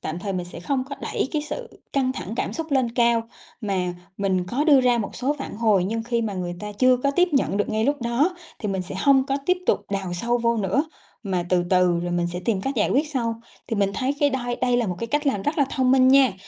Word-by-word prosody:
tạm 155 Hz, +2 st, -4 dB
thời 195 Hz, +1 st, -4 dB
mình 180 Hz, -2 st, -3 dB
sẽ 175 Hz, -, -9 dB
không 255 Hz, +8 st, -1 dB
có 280 Hz, +1 st, -7 dB
đẩy -, -, -2 dB
cái 305 Hz, -2 st, 0 dB
sự 470 Hz, +11 st, -7 dB
căng 260 Hz, -2 st, +1 dB
thẳng 220 Hz, -5 st, -6 dB
cảm -, -, -2 dB
xúc 325 Hz, -1 st, -5 dB
lên 260 Hz, -3 st, +2 dB
cao. 235 Hz, -1 st, +3 dB, 0.4 s
Mà 185 Hz, -5 st, -1 dB, 0.2 s
mình 190 Hz, -2 st, 0 dB
có 260 Hz, +10 st, -1 dB
đưa 290 Hz, -4 st, +6 dB
ra 245 Hz, -1 st, +3 dB
một 210 Hz, -, -4 dB
số 270 Hz, +4 st, 0 dB
phản 275 Hz, -, -6 dB
hồi, 215 Hz, -5 st, +3 dB
nhưng 225 Hz, +4 st, -2 dB
khi 235 Hz, 0 st, -1 dB
mà 215 Hz, -3 st, -2 dB
người 175 Hz, -1 st, -3 dB
ta 210 Hz, 0 st, -5 dB
chưa 255 Hz, +4 st, +4 dB
có 275 Hz, +3 st, 0 dB
tiếp 355 Hz, +6 st, +3 dB
nhận 270 Hz, -7 st, +1 dB
được 205 Hz, -, 0 dB
ngay 220 Hz, +1 st, 0 dB
lúc 285 Hz, 0 st, 0 dB
đó 270 Hz, +10 st, +1 dB, 0.2 s
thì 210 Hz, -, -3 dB
mình 190 Hz, -1 st, -1 dB
sẽ 180 Hz, -, -7 dB
hông 270 Hz, +4 st, +4 dB
có 275 Hz, -, 0 dB
tiếp 365 Hz, 0 st, +3 dB
tục -, -, +3 dB
đào 195 Hz, -3 st, -2 dB
sâu 235 Hz, +7 st, 0 dB
vô 235 Hz, 0 st, +1 dB
nữa, 215 Hz, -, +1 dB, 0.4 s
mà 185 Hz, -5 st, -1 dB
từ 180 Hz, -1 st, +2 dB
từ 180 Hz, -2 st, +3 dB
rồi 175 Hz, 0 st, -3 dB
mình 175 Hz, 0 st, +1 dB
sẽ 180 Hz, -, -4 dB
tìm 215 Hz, -5 st, +1 dB
cách 270 Hz, +7 st, -2 dB
giải 210 Hz, -, +2 dB
quyết 295 Hz, +4 st, +2 dB
sau. 230 Hz, -6 st, -2 dB, 0.3 s
Thì 225 Hz, -, -2 dB
mình 200 Hz, -1 st, +2 dB
thấy 265 Hz, +2 st, 0 dB
cái 290 Hz, -1 st, +4 dB
đây 245 Hz, -2 st, -2 dB
đây 245 Hz, -1 st, +1 dB
là 240 Hz, -2 st, +1 dB
một 180 Hz, -2 st, -3 dB
cái 230 Hz, -, -3 dB
cách 295 Hz, +4 st, -1 dB
làm 235 Hz, -8 st, +1 dB
rất 295 Hz, +7 st, -1 dB
là 285 Hz, -, +5 dB
thông 260 Hz, -1 st, +1 dB
minh 260 Hz, -1 st, +5 dB
nha. 265 Hz, -3 st, +6 dB
235 Hz, 275 wpm, -24 LUFS, 195-270 Hz, 0.4 s, đưa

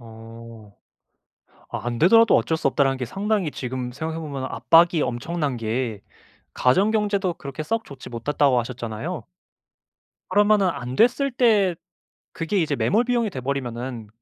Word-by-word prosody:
어. 115 Hz, -1 st, -12 dB, 1.0 s
아 -, -, -4 dB
'안 120 Hz, -1 st, -2 dB
되더라도 225 Hz, +6 st, +6 dB
어쩔 120 Hz, +8 st, +1 dB
수 160 Hz, -, +1 dB
없다.'라는 135 Hz, -1 st, +1 dB
게 125 Hz, -, -2 dB
상당히 195 Hz, -, -1 dB
지금 125 Hz, -2 st, -5 dB
생각해 160 Hz, +5 st, -4 dB
보면은 140 Hz, -4 st, -5 dB
압박이 165 Hz, -1 st, +4 dB
엄청난 140 Hz, +3 st, -2 dB
게 115 Hz, -1 st, -3 dB, 0.5 s
가정 190 Hz, +12 st, +3 dB
경제도 205 Hz, -4 st, 0 dB
그렇게 140 Hz, -1 st, -7 dB
썩 225 Hz, +8 st, -2 dB
좋지 135 Hz, -2 st, -11 dB
못했다고 130 Hz, +2 st, +1 dB
하셨잖아요. 120 Hz, +7 st, -5 dB, 1.1 s
그러면은 205 Hz, 0 st, +4 dB
안 130 Hz, -5 st, -5 dB
됐을 270 Hz, -, +3 dB
때 215 Hz, -7 st, +3 dB, 0.6 s
그게 165 Hz, +5 st, -2 dB
이제 155 Hz, -5 st, +1 dB
매몰 220 Hz, -, +2 dB
비용이 240 Hz, -3 st, +1 dB
돼 150 Hz, -9 st, -6 dB
버리면은 125 Hz, -3 st, -4 dB
145 Hz, 315 characters per minute, -23 LUFS, 125-195 Hz, 1.1 s, 되더라도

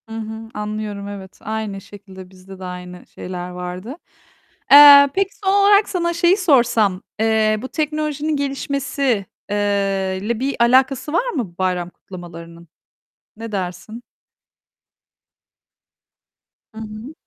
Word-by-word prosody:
Hı 225 Hz, -, -7 dB
hı, 220 Hz, 0 st, -7 dB
anlıyorum. 210 Hz, -1 st, -5 dB
Evet, 195 Hz, -2 st, -9 dB
aynı 215 Hz, -2 st, -4 dB
şekilde, 190 Hz, -2 st, -13 dB
bizde 190 Hz, 0 st, -14 dB
de -, -, -9 dB
aynı 180 Hz, 0 st, -9 dB
şeyler 180 Hz, -1 st, -7 dB
vardı. 180 Hz, +7 st, -7 dB, 0.8 s
Eee, 285 Hz, 0 st, +10 dB
peki, 390 Hz, 0 st, +1 dB, 0.2 s
son 385 Hz, -, +3 dB
olarak 405 Hz, +1 st, +4 dB
sana 340 Hz, -2 st, -1 dB
şeyi 345 Hz, +3 st, +3 dB
sorsam: 235 Hz, -, +2 dB, 0.2 s
Eee, 220 Hz, -1 st, +2 dB
bu 260 Hz, -, -5 dB
teknolojinin 305 Hz, -1 st, -2 dB
gelişmesi, 275 Hz, -5 st, -2 dB, 0.3 s
eee, 195 Hz, -2 st, -1 dB
ile 225 Hz, +2 st, -2 dB
bir 275 Hz, +2 st, -2 dB
alakası 260 Hz, +4 st, +2 dB
var -, -, +1 dB
mı 220 Hz, -, -4 dB
bayram 180 Hz, -2 st, -1 dB
kutlamalarının? 170 Hz, -2 st, -12 dB, 0.7 s
Ne 225 Hz, 0 st, -7 dB
dersin? 195 Hz, +4 st, -6 dB, 2.7 s
Hı -, -, -8 dB
hı. 220 Hz, +6 st, -9 dB
215 Hz, 120 wpm, -20 LUFS, 190-280 Hz, 2.7 s, Eee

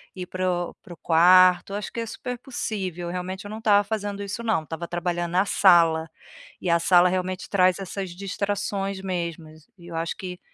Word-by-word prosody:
ir 185 Hz, -, -5 dB
para 185 Hz, 0 st, -2 dB, 0.2 s
o -, -, -14 dB
para 175 Hz, -, -11 dB
o -, -, -14 dB
quarto. 180 Hz, +3 st, +5 dB
Acho 205 Hz, -1 st, -5 dB
que 235 Hz, -, -4 dB
é 230 Hz, -, -2 dB
super 250 Hz, +2 st, -6 dB
possível, 190 Hz, -9 st, -4 dB
realmente 185 Hz, +2 st, -5 dB
eu -, -, -7 dB
não 220 Hz, -, -6 dB
estava 205 Hz, -2 st, +4 dB
fazendo 205 Hz, -1 st, -4 dB
isso 205 Hz, +4 st, -5 dB
não, 220 Hz, -9 st, +1 dB
estava 165 Hz, +2 st, -6 dB
trabalhando 175 Hz, 0 st, -2 dB
na 190 Hz, +3 st, +3 dB
sala, 165 Hz, -5 st, +4 dB, 0.5 s
e -, -, -5 dB
a 170 Hz, 0 st, +4 dB
sala 180 Hz, +1 st, +5 dB
realmente 185 Hz, 0 st, -3 dB
traz 185 Hz, -2 st, +3 dB
essas 195 Hz, 0 st, -5 dB
distrações 200 Hz, +1 st, -3 dB
mesmo. 170 Hz, -3 st, -4 dB, 0.3 s
E 170 Hz, -, -15 dB
eu 170 Hz, -, -8 dB
acho 165 Hz, 0 st, -2 dB
que 180 Hz, -1 st, -7 dB
185 Hz, 195 wpm, -24 LUFS, 175-200 Hz, 0.5 s, quarto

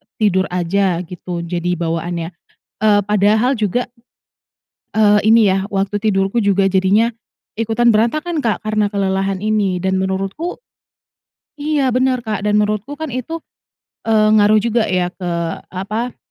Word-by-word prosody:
tidur 190 Hz, -3 st, +1 dB
aja 180 Hz, 0 st, 0 dB
gitu, 175 Hz, 0 st, -6 dB
jadi 175 Hz, +1 st, -2 dB
bawaannya. 170 Hz, 0 st, -3 dB, 0.5 s
Eee, 205 Hz, -1 st, +4 dB
padahal 210 Hz, +5 st, +3 dB
juga 220 Hz, +3 st, -1 dB, 1.1 s
Eee, 210 Hz, -1 st, +4 dB
ini 220 Hz, -2 st, +5 dB
ya, 190 Hz, +1 st, 0 dB
waktu 195 Hz, +1 st, 0 dB
tidurku 195 Hz, 0 st, 0 dB
juga 200 Hz, -2 st, +2 dB
jadinya 195 Hz, +5 st, +3 dB, 0.5 s
ikutan 225 Hz, +1 st, +2 dB
berantakan, 305 Hz, +10 st, +1 dB
Kak, 230 Hz, -7 st, -1 dB
karena 215 Hz, -1 st, 0 dB
kelelahan 195 Hz, -1 st, -1 dB
ini. 205 Hz, -4 st, 0 dB
Dan 190 Hz, 0 st, 0 dB
menurutku 195 Hz, -, -3 dB, 1.0 s
Iya, 285 Hz, -4 st, +1 dB
bener, 255 Hz, -1 st, +1 dB
Kak. 215 Hz, -2 st, -2 dB
Dan 210 Hz, -, +2 dB
menurutku 210 Hz, +6 st, -1 dB
kan 315 Hz, -4 st, -5 dB
itu, 255 Hz, +6 st, -4 dB, 0.7 s
eee, 215 Hz, -1 st, +4 dB
ngaruh 210 Hz, +1 st, +5 dB
juga 230 Hz, +1 st, +1 dB
ya 180 Hz, -1 st, 0 dB
ke, 180 Hz, -2 st, -5 dB, 0.4 s
apa, 215 Hz, +6 st, -4 dB
205 Hz, 130 wpm, -18 LUFS, 190-225 Hz, 1.1 s, ini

